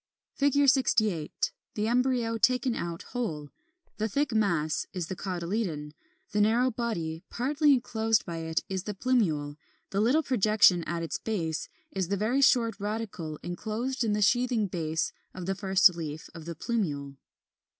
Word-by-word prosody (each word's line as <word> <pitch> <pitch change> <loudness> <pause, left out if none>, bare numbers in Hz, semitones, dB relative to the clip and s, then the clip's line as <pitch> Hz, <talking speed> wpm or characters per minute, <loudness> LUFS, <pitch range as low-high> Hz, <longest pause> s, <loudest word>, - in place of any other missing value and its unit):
68. 265 - +2 0.2
The 210 0 0
embryo 240 -2 +1
taken 250 +2 +3
out 170 -5 -4
whole; 155 - -3 0.5
the 220 +1 -1
thick 280 +2 0
mass 170 -8 +1
is 180 -4 -4
the 190 - -3
cotyledon, 175 -4 -3 0.4
the 210 - +2
narrow 235 +5 +3
body 170 -9 -3
partly 290 +4 +2
enclosed 225 -3 +1
by 170 -2 -5
it 160 0 -2
is 190 -1 -3
the 210 - -4
plumule, 165 - 0 0.3
the 200 - +1
little 265 +9 +3
projection 215 - +4
at 170 0 -3
its 165 - -3
base 165 -8 -2 0.2
is 190 -3 -2
the 200 +2 -1
very 235 +7 +1
short 235 -5 +4
radicle 200 -7 -4
enclosed 225 +8 -3
in 215 -2 +1
the 210 0 +2
sheathing 245 0 +2
base 160 -3 -2 0.2
of 185 - -6
the 195 - 0
first 190 -1 +4
leaf 155 -2 -6
of 165 -2 -10
the 170 0 -5
plumule. 145 - -2
210 Hz, 150 wpm, -28 LUFS, 170-235 Hz, 0.5 s, projection